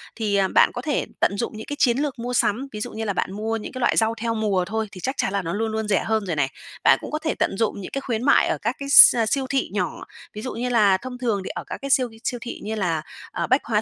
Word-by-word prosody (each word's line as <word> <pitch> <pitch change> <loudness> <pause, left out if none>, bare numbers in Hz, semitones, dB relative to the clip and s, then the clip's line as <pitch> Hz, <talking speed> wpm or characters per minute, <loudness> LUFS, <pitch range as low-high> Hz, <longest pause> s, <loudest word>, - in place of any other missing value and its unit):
Thì, 210 -3 -1
à, 195 -1 +3
bạn - - +4
có 245 - -4
thể 290 +1 -1
tận 200 - +1
dụng 235 -1 -3
những 220 - -7
cái 290 - -5
chiến 245 -3 +3
lược 285 -4 -2
mua 245 +1 -4
sắm, 240 +3 +1
ví 210 - -6
dụ - - -4
như 220 - -5
là 200 - -1
bạn 185 - -2
mua 220 +2 -2
những 215 - -7
cái 255 - -7
loại 240 - +2
rau 225 0 +3
theo 230 -1 0
mùa 200 -4 0
thôi 220 +2 -2
thì 185 - -10
chắc 265 - -1
chắn 190 - -1
là 200 - 0
nó 165 -2 -4
luôn 220 +2 -1
luôn 220 -1 -2
rẻ 195 -3 +2
hơn 220 -2 0
rồi 170 -4 -2
này. 140 -2 +1 0.4
Bạn - - +6
cũng - - -7
có 305 - -1
thể 315 0 -2
tận 195 - 0
dụng 215 -2 -1
những 185 - -8
cái 275 - -3
khuyến 235 -3 -3
mại 285 - +4
ở - - 0
các 230 +4 -1
cái 280 0 -5
s 280 - +10
siêu 270 +4 0
thị 270 -1 0
nhỏ. - - -2 0.3
Ví 210 - -7
dụ 255 - -5
như 250 +1 -3
là 210 -5 +4
thông 250 +3 -8
thường 230 -5 -1
thì - - -6
ở - - -5
các - - -5
cái 275 - -5
siêu 260 -2 +3
ghi 225 -1 -16
siêu 245 - -2
thị 245 - -6
như 220 +1 -3
là, 175 -7 -1 0.3
ờ, - - -2
Bách 260 +3 +2
Hóa 215 -2 +1
225 Hz, 315 wpm, -23 LUFS, 205-250 Hz, 0.4 s, s